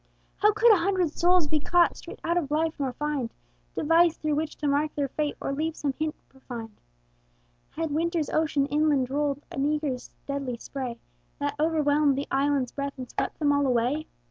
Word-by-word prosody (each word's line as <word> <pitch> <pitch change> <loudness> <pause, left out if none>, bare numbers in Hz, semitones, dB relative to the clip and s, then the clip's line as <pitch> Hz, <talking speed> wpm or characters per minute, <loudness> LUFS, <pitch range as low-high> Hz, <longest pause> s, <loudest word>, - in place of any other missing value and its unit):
How 420 - +5
could 440 +2 +6
a - - +5
hundred 360 -2 +1
souls 350 -1 +3
be 305 +1 +1
caught 345 +3 +3
Straight - - -10
out 340 - +1
of 335 -6 0
life, 315 +2 +1
nor 270 -2 0
find 285 -4 -2 0.4
Device 330 +1 +4
through 305 -1 -1
which 305 +1 -1
to 295 - -2
mark 290 +2 +1
their 280 -2 -1
fate, 300 +1 -2
Or 275 - -2
leave 315 +3 -2
some 280 -2 -1
hint 310 +2 -2
behind? 235 -5 -9 0.9
Had 325 -1 -3
winter's 330 +1 0
ocean 300 -3 +2
inland 290 -3 +1
rolled 290 0 0
An 275 - -2
eagre's 290 -3 -1 0.2
deadly 275 -3 -3
spray, 250 -1 -5 0.4
That 285 0 -1
overwhelmed 300 -3 +3
the 280 - -1
island's 275 -2 +1
breadth 280 0 -4
And 255 -2 -7
swept - - -2
them 295 -2 +2
all 285 -1 +2
away? 255 +5 +1
295 Hz, 185 wpm, -27 LUFS, 275-315 Hz, 0.9 s, could